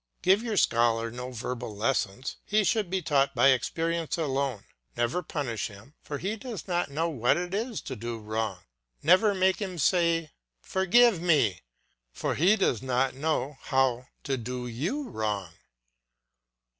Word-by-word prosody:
Give 190 +3 +5
your 225 -3 -2
scholar 115 -3 +2
no 125 +2 -6
verbal 125 -2 -5
lessons; 115 +1 -1
he 215 +1 +2
should 205 -1 +1
be 190 -1 -1
taught 140 -3 +2
by 135 - +6
experience 165 +6 0
alone; 135 -7 -1 0.3
never 120 +9 0
punish 135 - -3
him, 105 +6 -14
for 145 - -5
he 195 +8 -2
does 225 - -7
not 175 -4 0
know 160 +4 -1
what 125 -5 +2
it 175 +1 -4
is 225 +2 -2
to 130 - -6
do 115 +1 -5
wrong; 110 -3 -3 0.4
never 190 +6 +5
make 190 +2 +2
him 185 -3 -4
say, 165 0 +2 0.3
"Forgive 190 - +3
me," 140 - +2 0.5
for - - -2
he 185 +7 +4
does 130 - +1
not 130 0 0
know 145 -1 -2
how 130 -2 +1 0.2
to 135 -1 -1
do 125 +1 -5
you 165 - -3
wrong. 105 - -3
140 Hz, 155 wpm, -28 LUFS, 120-180 Hz, 0.5 s, by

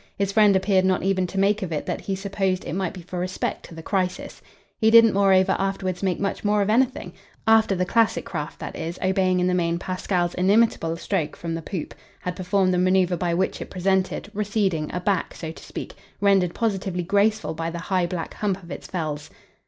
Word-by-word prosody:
His 200 0 0
friend 210 -1 +5
appeared 190 0 +3
not 185 -1 +1
even 190 -1 +1
to 190 - -7
make 205 +2 +2
of 185 -3 -4
it 150 - -2
that - - -3
he 195 - -2
supposed 195 -1 -2
it - - -4
might 185 -1 -1
be 180 - -9
for 180 +1 -6
respect 185 +1 -3
to 170 - -12
the 165 - -9
crisis. 185 -1 -2 0.4
He 220 - +4
didn't 230 -1 +7
moreover 195 -1 +4
afterwards 195 -2 -2
make 185 -3 0
much 200 0 -2
more 210 0 +2
of 205 - 0
anything 245 -6 +1 0.3
after 220 -3 +4
the 180 0 0
classic 230 +2 +2
craft, 150 -4 -5
that - - -7
is, 165 +2 -5
obeying 185 -1 +2
in 180 - +2
the 180 - +1
main 170 -1 +1
Pasquale's 180 -1 -1
inimitable 185 -4 +2
stroke 160 -2 -2
from 165 -1 -5
the 165 - -3
poop, 170 0 -5 0.3
had 180 0 -4
performed 185 0 +1
the 180 - +2
manoeuvre 185 0 +3
by 170 -1 -1
which 190 +2 -1
it - - -6
presented, 190 +2 -1
receding, 200 -7 0
a 180 - -2
back, 190 0 -1
so 160 -2 -6
to - - -12
speak, - - -7 0.3
rendered 195 -3 +3
positively 195 -5 -1
graceful 205 +1 +1
by 165 +1 -3
the 170 - -5
high 180 0 0
black 170 -2 -5
hump 195 -2 -2
of 170 - -11
its - - -7
felze. 155 -4 -4
185 Hz, 215 wpm, -24 LUFS, 175-200 Hz, 0.4 s, didn't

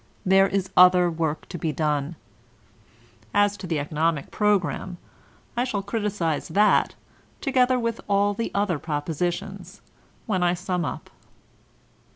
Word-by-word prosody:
There 195 +1 +5
is 195 -1 -2
other 180 -1 +6
work 160 -2 -3
to 175 - -6
be 160 - -1
done. 150 0 -1 1.2
As 205 0 +3
to 190 -1 -7
the 165 -2 -1
economic 150 +1 -1
program, 195 -3 0 0.6
I 240 - +1
shall 210 -6 -2
criticise 205 -7 -2
that, 205 +6 +3 0.4
together 255 -2 +2
with 230 -1 -2
all 200 0 +2
the 230 +3 -3
other 200 -6 0
propositions, 175 +6 -4 0.5
when 190 -5 -1
I 175 0 +2
sum 180 -1 -2
up. 130 - -6
185 Hz, 130 wpm, -24 LUFS, 165-205 Hz, 1.2 s, other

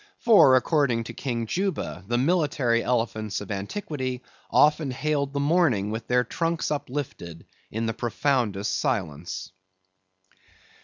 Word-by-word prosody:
For 165 - +6
according 130 -3 +2
to - - -8
King 120 -4 -3
Juba, 185 - -2
the 120 +2 +1
military 140 -5 +2
elephants 110 -4 -1
of 105 0 -8
antiquity 130 - -4 0.3
often 150 -1 +4
hailed 140 +2 -1
the 140 - -2
morning 140 - +2
with 110 +1 -5
their 125 0 +3
trunks 165 +3 -2
uplifted 125 - -5 0.2
in 110 +2 -3
the 115 - -1
profoundest 120 -4 0
silence. 95 - -3
125 Hz, 120 wpm, -25 LUFS, 110-150 Hz, 0.3 s, For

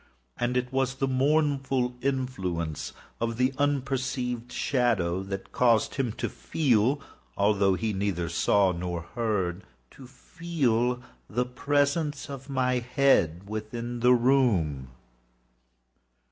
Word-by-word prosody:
And 125 +1 0
it 125 +1 -2
was 135 0 +1
the 135 0 -1
mournful 135 -2 +1
influence 95 - -2 0.3
of 115 0 -2
the 130 +2 +2
unperceived 130 -3 -1
shadow 110 -10 +1
that 95 0 -6
caused 115 -3 +3
him 135 -5 -1
to - - -3
feel—although 105 -7 +1
he 110 +3 -2
neither 95 -3 -1
saw 95 +4 +3
nor 85 -1 -4
heard—to 95 - -4
feel 125 -6 -1 0.3
the 125 +3 0
presence 145 +3 0
of 135 0 -8
my 130 -2 +1
head 115 - +2
within 115 +3 -5
the 125 +1 +5
room. 115 - +2
125 Hz, 105 wpm, -27 LUFS, 100-135 Hz, 0.3 s, the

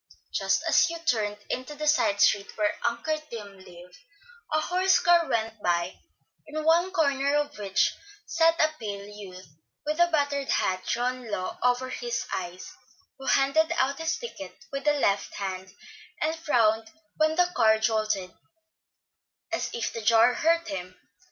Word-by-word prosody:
Just - - +1
as - - +5
Hugh 335 0 -4
turned 215 -10 0
into 255 +4 -4
the 305 +1 -4
side 220 -9 +2
street 200 -1 +2
where 210 -1 +1
Uncle 310 +7 -3
Tim 205 -4 -9
lived, 180 0 -14 0.5
a 310 - +2
horse 365 +4 +3
car 345 -2 +4
went 225 -1 -2
by, 175 0 -1 0.5
in 310 +1 -4
one 335 +3 +4
corner 280 -5 +1
of 295 0 -1
which 195 -2 +1 0.3
sat 330 0 +2
a 310 - +4
pale 200 -2 -5
youth, 195 -4 -11 0.4
with 305 +2 -2
a 345 - +6
battered 285 -4 0
hat 185 0 0
drawn 250 0 -2
low 185 -3 -3
over 250 +1 +1
his 240 -2 -3
eyes, 180 0 -5 0.5
who 270 - -8
handed 295 +4 +3
out 270 +1 +1
his 325 +1 -1
ticket 195 - -8 0.2
with 275 +1 -4
the 295 - +4
left 205 -9 0
hand, 190 -1 -5 0.5
and 315 +1 0
frowned 225 -8 +1 0.3
when 310 0 +2
the 355 +1 +2
car 220 -2 +5
jolted, 215 -4 0 1.2
as 335 - -1
if 235 - -3
the 230 - -5
jar 225 +3 +5
hurt 335 +3 +1
him. 185 - -6
245 Hz, 160 wpm, -27 LUFS, 205-310 Hz, 1.2 s, a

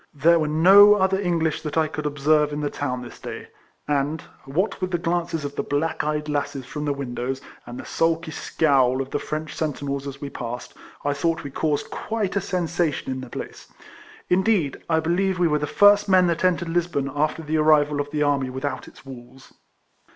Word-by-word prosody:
There 165 +4 +4
were 155 - 0
no 195 +7 +7
other 190 -1 +2
English 165 -4 0
that 150 0 -4
I 160 -1 +3
could 150 -1 -4
observe 150 +1 +2
in 150 0 -3
the 145 - -2
town 125 -3 -3
this 120 - -11
day; - - -8 0.4
and, 145 +1 -1 0.2
wliat 180 +10 -1
with 185 - -1
the 175 - 0
glances 170 -2 -2
of 145 0 -5
the - - 0
black 145 +3 -1
eyed 150 0 -2
lasses 145 -3 -2
from 150 +4 -5
the 145 - 0
windows, 130 -1 -4 0.3
and 120 +1 -7
the - - -8
sulky 165 0 0
scowl 135 -5 +2
of 135 0 -4
the 145 - -1
French 155 0 -5
sentinels 140 -2 -3
as 140 0 -7
we 140 -1 -6
passed, 120 0 -6 0.3
I 145 - +2
thought 165 +3 -1
we 140 - -7
caused 150 +1 -1
quite 215 -4 -3
a 200 - +1
sensation 170 -6 -1
in 130 0 -4
the 130 - -9
place. - - -8 0.6
Indeed 185 -6 +1
I 160 -1 +3
believe 180 +4 0
we 175 -1 +3
were 150 -1 +1
the 150 - -2
first 205 +3 +5
men 185 -1 +5
that 170 0 0
entered 175 -2 +1
Lisbon 165 -5 -1
after 155 +2 -1
the 155 +1 -1
arrival 150 -1 +3
of 145 - -6
the 150 0 0
army 140 -3 +1
without 130 +1 -4
its - - -16
walls. 130 0 -13
150 Hz, 200 wpm, -23 LUFS, 140-170 Hz, 0.6 s, no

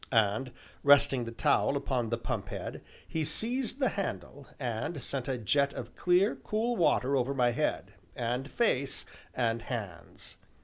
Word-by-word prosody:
And, 110 +2 +2 0.3
resting 140 -3 +5
the 115 - -5
towel 125 +4 +2
upon 125 -4 -1
the 115 - 0
pump 115 - -3
head, - - -5 0.3
he 160 - -1
seized 235 - -2
the 260 -4 +3
handle, 145 -8 -5
and 125 +5 -2
sent 130 0 -4
a 130 -2 -1
jet 140 +5 +2
of - - -7
clear, 180 +4 +3
cool 230 +3 -1
water 140 - +3
over 135 +1 +1
my 125 -2 +3
head, - - -1 0.2
and 125 +3 -2
face, 140 - +1 0.3
and 115 -2 +1
hands. 100 -10 -7
135 Hz, 150 wpm, -30 LUFS, 120-160 Hz, 0.3 s, resting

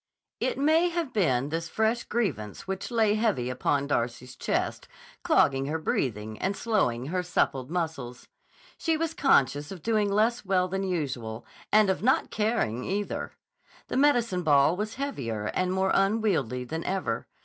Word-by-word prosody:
It - - -1
may 315 +5 +3
have 335 -6 -3
been 140 - +1
this 165 +2 -3
fresh 220 +2 0
grievance 190 - -2
which 190 0 -4
lay 225 -3 +3
heavy 210 - 0
upon 140 +2 0
Darcy's 125 -2 -2
chest, - - -2 0.3
clogging 135 0 +3
her 155 +2 -1
breathing 110 -8 -2
and 195 +1 -1
slowing 135 - 0
her 180 - +1
suppled 135 -7 0
muscles. 160 -8 -4 0.5
She 325 -2 +1
was 325 0 -2
conscious 145 - +2
of 185 -5 -9
doing 215 -3 +1
less 225 +4 +2
well 185 -2 +2
than 190 +1 -2
usual—and 145 - -1
of 190 - -3
not 255 +5 +2
caring, 210 - 0
either! 205 +2 -3 0.6
The - - -1
medicine 240 -9 +3
ball 150 0 +4
was 215 +5 -4
heavier 120 - -3
and 185 0 0
more 190 0 +1
unwieldy 195 - +1
than 160 +6 -4
ever. 180 -12 -2
185 Hz, 150 wpm, -27 LUFS, 130-220 Hz, 0.6 s, ball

